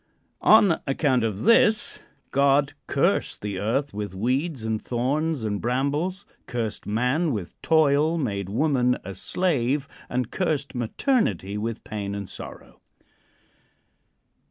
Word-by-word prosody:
On 205 -6 +5
account 135 -3 +2
of 110 -4 -2
this, 220 -1 +4 0.3
God 140 0 +3
cursed - - +1
the 100 -2 -3
earth 135 +8 -1
with 105 -2 -5
weeds 130 - -1
and 110 -1 -1
thorns 140 +4 -1
and 105 -2 -2
brambles, 145 - -1 0.2
cursed 115 -4 -4
man 125 +10 +1
with 100 -6 -5
toil, 155 +1 +3
made 100 - -2
woman 125 +1 +2
a 95 - -6
slave, 140 - 0 0.2
and 125 -1 -2
cursed 155 -6 -1
maternity 120 - 0
with 110 +2 -4
pain 100 -2 -4
and 100 -2 -5
sorrow. - - -10
130 Hz, 120 wpm, -25 LUFS, 110-155 Hz, 0.3 s, On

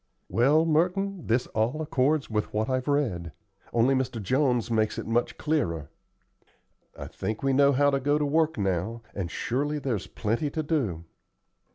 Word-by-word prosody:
"Well, 145 +7 +4
Merton, 180 +3 0
this 120 +2 +2
all 115 +7 0
accords 150 -1 +1
with 105 -1 -2
what 110 +1 -1
I've 130 +1 -1
read, 110 - 0 0.4
only 120 +3 +3
Mr. 130 -3 -1
Jones 125 +2 +1
makes 110 -1 +1
it - - -4
much 120 +1 0
clearer. 85 - -1 1.1
I - - -6
think 110 +3 -5
we 135 0 +2
know 140 +1 +5
how 145 +1 +3
to 140 - +1
go 145 +2 +2
to 150 - 0
work 160 +1 +1
now, 100 +4 -1
and 95 -4 -3
surely 145 +10 -1
there's 130 -9 -2
plenty 115 +8 -1
to 155 +2 -3
do." 125 - -1
130 Hz, 165 wpm, -27 LUFS, 110-150 Hz, 1.1 s, know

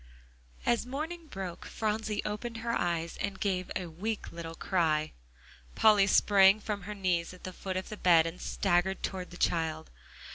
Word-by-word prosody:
As 240 -1 +2
morning 315 +6 -5
broke, 190 - -6
Phronsie 215 -1 -2
opened 230 +3 -4
her 235 - +1
eyes, 170 -5 -1
and 200 -1 -3
gave 185 -3 -1
a 185 - -2
weak 200 +7 -4
little 165 -1 -7
cry. 155 -4 +1 0.6
Polly 210 -3 +6
sprang 200 0 +6
from 210 -1 -3
her 210 - -4
knees 180 -3 0
at 180 - -18
the 185 - -6
foot 190 0 -4
of 185 - -4
the 215 - -6
bed, 170 -4 +5
and 165 +2 -5
staggered 190 0 +1
toward 185 -2 -3
the 175 - -11
child. 160 -2 0
190 Hz, 170 wpm, -30 LUFS, 170-210 Hz, 0.6 s, Polly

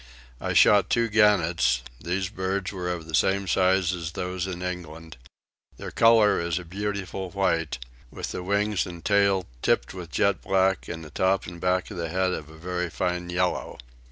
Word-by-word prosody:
I - - -2
shot 105 -1 +5
two 115 -1 +2
gannets: 85 - +3 0.2
these 90 +2 -2
birds 95 -1 -2
were 90 -3 -4
of 85 -2 -5
the 80 - -10
same 95 +4 +2
size 95 -1 +2
as 85 -3 -5
those 90 +1 -3
in 90 -1 -5
England; 80 -4 -6 0.6
their - - -7
colour 115 -2 +5
is 85 -1 -1
a 90 - -5
beautiful 95 0 -4
white, 85 -5 0 0.3
with - - -6
the - - -4
wings 100 +2 0
and 85 -1 -10
tail 100 -2 +3 0.2
tipped - - +1
with 90 -3 -8
jet 100 +4 +1
black 95 0 +1
and 80 0 -6
the 75 - -12
top 95 +4 +1
and 85 -1 -9
back 90 0 0
of - - -7
the 85 -1 -3
head 95 +2 0
of 75 -3 -6
a 80 - -13
very 90 +1 -3
fine 90 +1 -2
yellow. 90 0 -1
90 Hz, 185 wpm, -26 LUFS, 85-95 Hz, 0.6 s, shot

